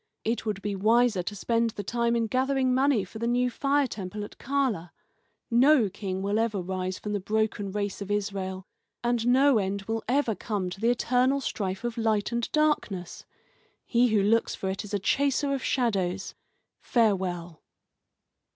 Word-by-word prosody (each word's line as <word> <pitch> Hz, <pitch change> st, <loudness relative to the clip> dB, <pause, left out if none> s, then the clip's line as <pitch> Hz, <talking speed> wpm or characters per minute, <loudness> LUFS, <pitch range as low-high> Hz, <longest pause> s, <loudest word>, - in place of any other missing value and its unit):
It 230 Hz, 0 st, -2 dB
would 205 Hz, -2 st, -3 dB
be 205 Hz, -1 st, -2 dB
wiser 220 Hz, 0 st, +3 dB
to 205 Hz, +4 st, -5 dB
spend 230 Hz, +3 st, +1 dB
the 205 Hz, -2 st, -6 dB
time 235 Hz, +3 st, 0 dB
in 230 Hz, -1 st, +1 dB
gathering 260 Hz, +2 st, +1 dB
money 260 Hz, -4 st, +3 dB
for 205 Hz, +4 st, -10 dB
the 235 Hz, -, -1 dB
new 245 Hz, +1 st, +1 dB
fire 280 Hz, +2 st, +1 dB
temple 210 Hz, -3 st, -5 dB
at 205 Hz, -, -9 dB
Chala. 255 Hz, -10 st, -1 dB, 0.6 s
No 250 Hz, -2 st, +5 dB
king 190 Hz, -1 st, -4 dB
will 205 Hz, +2 st, +1 dB
ever 225 Hz, -3 st, 0 dB
rise 185 Hz, 0 st, -3 dB
from 210 Hz, -, -5 dB
the 205 Hz, -, 0 dB
broken 210 Hz, 0 st, -1 dB
race 205 Hz, 0 st, -3 dB
of 200 Hz, -, -5 dB
Israel, 195 Hz, -2 st, -2 dB, 0.4 s
and 240 Hz, -1 st, 0 dB
no 260 Hz, 0 st, +5 dB
end 195 Hz, 0 st, -2 dB
will 225 Hz, +2 st, -3 dB
ever 255 Hz, -2 st, +2 dB
come 200 Hz, -4 st, -3 dB
to 195 Hz, -, -8 dB
the 230 Hz, -, +3 dB
eternal 250 Hz, +3 st, +2 dB
strife 195 Hz, -6 st, -3 dB
of 240 Hz, -1 st, -3 dB
light 220 Hz, -2 st, +1 dB
and 235 Hz, -1 st, -2 dB
darkness. 255 Hz, -, 0 dB, 0.6 s
He 240 Hz, +1 st, +3 dB
who 215 Hz, -3 st, +2 dB
looks 225 Hz, +3 st, +2 dB
for 190 Hz, -, -3 dB
it 195 Hz, -, -4 dB
is 210 Hz, 0 st, -4 dB
a -, -, +3 dB
chaser 275 Hz, +6 st, +1 dB
of 270 Hz, -, -2 dB
shadows. 195 Hz, -7 st, 0 dB, 0.5 s
Farewell." 185 Hz, -, 0 dB
220 Hz, 175 wpm, -27 LUFS, 195-245 Hz, 0.6 s, No